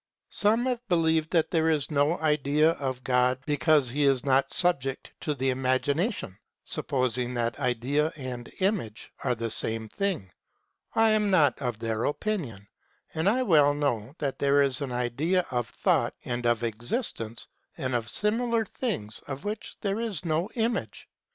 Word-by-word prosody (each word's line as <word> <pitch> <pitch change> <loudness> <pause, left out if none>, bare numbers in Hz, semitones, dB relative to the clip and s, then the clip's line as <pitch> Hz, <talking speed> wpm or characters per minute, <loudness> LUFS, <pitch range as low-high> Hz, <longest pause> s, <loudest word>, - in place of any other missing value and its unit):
Some 220 +4 +3
have 250 -2 0
believed 160 -3 +2
that 165 -2 +1
there 160 -1 +2
is 150 -2 0
no 145 +4 +2
idea 150 0 +2
of 130 -5 -4
God 125 0 +2
because 145 -2 +2
he 145 +3 0
is 135 -2 +2
not 135 0 +2
subject 140 -7 +1
to 150 - -1
the 130 0 0
imagination, 130 - -1 0.3
supposing 125 -1 -1
that 120 +2 -1
idea 135 +4 0
and 130 -4 -6
image 185 - -1
are 125 - +1
the 115 0 -3
same 110 0 -1
thing. 180 - -2 0.6
I 225 0 +5
am 210 -1 +2
not 155 -9 +3
of 120 -4 -2
their 115 0 -2
opinion, 145 - -3 0.5
and 160 +5 +2
I 255 +5 +2
well 150 - +4
know 135 -3 -1
that 140 -2 -3
there 140 0 +4
is 135 -1 0
an 135 -3 -3
idea 135 +10 0
of 120 -2 -1
thought - - +1
and 120 -1 -2
of 120 -1 +1
existence 115 - -3 0.3
and 130 -5 -2
of 120 -1 -1
similar 230 +1 +1
things 170 - -4
of 140 +3 -6
which 210 +1 -5
there 200 +1 -1
is 210 -7 -3
no 165 +3 0
image. 230 0 -2
140 Hz, 160 wpm, -27 LUFS, 125-175 Hz, 0.6 s, I